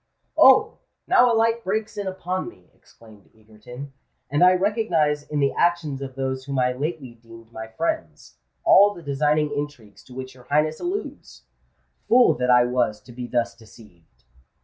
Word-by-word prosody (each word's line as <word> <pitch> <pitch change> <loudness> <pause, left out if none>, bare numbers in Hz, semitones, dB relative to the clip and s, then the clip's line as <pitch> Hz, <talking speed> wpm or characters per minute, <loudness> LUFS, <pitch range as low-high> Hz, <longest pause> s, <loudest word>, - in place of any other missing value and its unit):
"Oh! - - +5 0.3
now 245 0 +4
a - - +2
light 230 +1 +1
breaks 215 +3 -3
in 205 -1 -4
upon 185 0 -4
me," 90 -1 -21
exclaimed 110 -3 -20
Egerton; 110 +6 -12 0.4
"and 145 +4 +2
I 180 0 +7
recognise 180 -7 0
in 150 - -2
the 140 -1 +1
actions 165 -6 0
of 135 -1 -7
those 130 -1 -3
whom 140 -1 -4
I 125 0 +2
lately 140 -1 -5
deemed 115 0 -16
my 110 -1 -8
friends, 315 - -5 0.2
all 205 +1 +5
the 170 - -12
designing 150 +1 0
intrigues 145 -8 -7
to 125 - -14
which 130 0 -7
your 125 -1 -18
Highness 155 +2 0
alludes! 380 +4 -6 0.7
Fool 245 +1 +5
that 125 0 0
I 125 -1 +6
was 120 -4 -1
to 125 - -15
be 120 0 -7
thus 120 -1 -1
deceived!" 95 - -20
140 Hz, 170 wpm, -23 LUFS, 120-175 Hz, 0.7 s, I